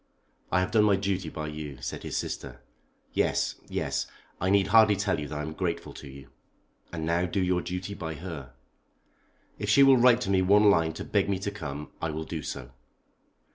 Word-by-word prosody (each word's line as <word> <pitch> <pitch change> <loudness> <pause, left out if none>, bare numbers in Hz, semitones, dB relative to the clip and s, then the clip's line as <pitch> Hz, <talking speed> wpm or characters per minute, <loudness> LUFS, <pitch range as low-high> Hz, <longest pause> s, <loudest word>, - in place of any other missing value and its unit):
"I 95 - +3
have 90 - -1
done 105 -2 +4
my 100 -2 +5
duty 95 -3 -2
by 75 0 -5
you," 75 -3 -7
said - - -5
his - - -4
sister. 65 -3 -5 0.5
"Yes, - - 0
yes. - - -2 0.3
I 95 - 0
need 100 0 +4
hardly 110 -1 +6
tell 100 -4 0
you 75 - -4
that 75 - -5
I 75 - -3
am 80 +1 -5
grateful 85 0 -3
to - - -10
you." 70 0 -12 0.6
"And 80 -2 -4
now 85 +2 +1
do 95 - -1
your 90 -1 +1
duty 90 +3 -5
by 80 -4 -5
her." 75 -7 -8 1.1
"If 105 +1 -3
she 140 +6 +7
will 135 -1 +7
write 125 0 +5
to 100 - -1
me 95 -1 +4
one 100 +2 +6
line 80 -3 +2
to - - -6
beg - - 0
me 100 - +1
to 100 - -2
come 75 -7 -6
I 80 - -1
will 80 +1 -4
do 80 -1 -5
so." 60 -3 -6
90 Hz, 210 wpm, -28 LUFS, 75-100 Hz, 1.1 s, she